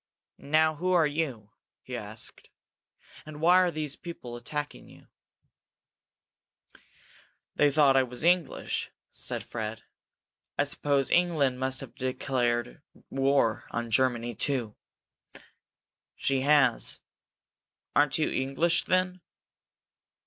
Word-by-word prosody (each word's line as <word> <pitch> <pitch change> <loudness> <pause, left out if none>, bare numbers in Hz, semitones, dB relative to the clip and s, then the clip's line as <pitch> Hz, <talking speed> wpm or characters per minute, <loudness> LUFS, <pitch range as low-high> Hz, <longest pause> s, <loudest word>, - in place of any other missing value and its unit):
"Now 155 +1 +2
who 185 +3 0
are 170 -3 +5
you?" 140 -9 -3 0.3
he 130 - -6
asked. 110 -1 -7 0.7
"And 155 -1 -10
why 175 +3 +6
were 180 - +2
those 155 -3 -3
people 145 -9 -8
attacking 150 +4 -5
you?" - - -17 2.5
"They 145 - +4
thought 140 -2 +4
I 135 - +6
was 125 +2 -5
English," 175 -3 +1 0.2
said - - -4
Fred. 110 -1 -5 0.7
"I - - +4
suppose 140 -1 0
England 155 -8 +2
must 130 0 0
have - - -9
declared 125 - -1 0.3
war 135 -4 +2
on 120 -1 -4
Germany, 120 -1 +1
too." 120 -3 -1 1.4
"She 135 -1 0
has. 140 -3 +3 1.0
Aren't 145 -1 +4
you 155 - +1
English, 135 +6 +1
then?" 185 0 +1
140 Hz, 105 wpm, -28 LUFS, 125-155 Hz, 2.5 s, why